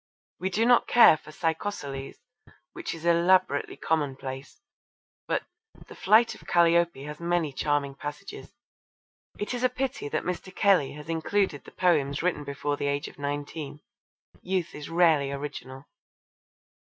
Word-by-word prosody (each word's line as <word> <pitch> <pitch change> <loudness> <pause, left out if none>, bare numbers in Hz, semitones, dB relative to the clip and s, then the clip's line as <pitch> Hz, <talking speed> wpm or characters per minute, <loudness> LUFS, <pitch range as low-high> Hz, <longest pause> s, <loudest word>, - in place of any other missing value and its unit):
We 190 - -1
do 215 +5 +1
not 245 0 +5
care 240 -9 +8
for 155 - -14
Psychossolles, 155 -5 -3 0.6
which - - -5
is 165 0 -10
elaborately 170 -2 +3
commonplace, 135 -3 -3 0.7
but - - 0 0.4
The - - -11
Flight 220 +4 +4
of - - -15
Calliope 170 -4 +3
has 150 +1 -7
many 170 -3 0
charming 145 0 0
passages. 145 +8 -8 0.9
It 205 - -3
is 245 0 -3
a 255 - +4
pity 255 - -3
that - - -1
Mr. 180 +1 -4
Kelly 190 -9 +3
has 150 +1 -10
included 165 0 -1
the - - -12
poems 150 -5 +1
written 175 -5 0
before 145 +1 -3
the 145 - -2
age 140 0 -1
of - - -13
nineteen. 145 +1 -5 0.6
Youth 185 -2 -2
is 150 +1 -8
rarely 165 -5 +3
original. 140 -1 -7
160 Hz, 140 wpm, -27 LUFS, 145-180 Hz, 0.9 s, care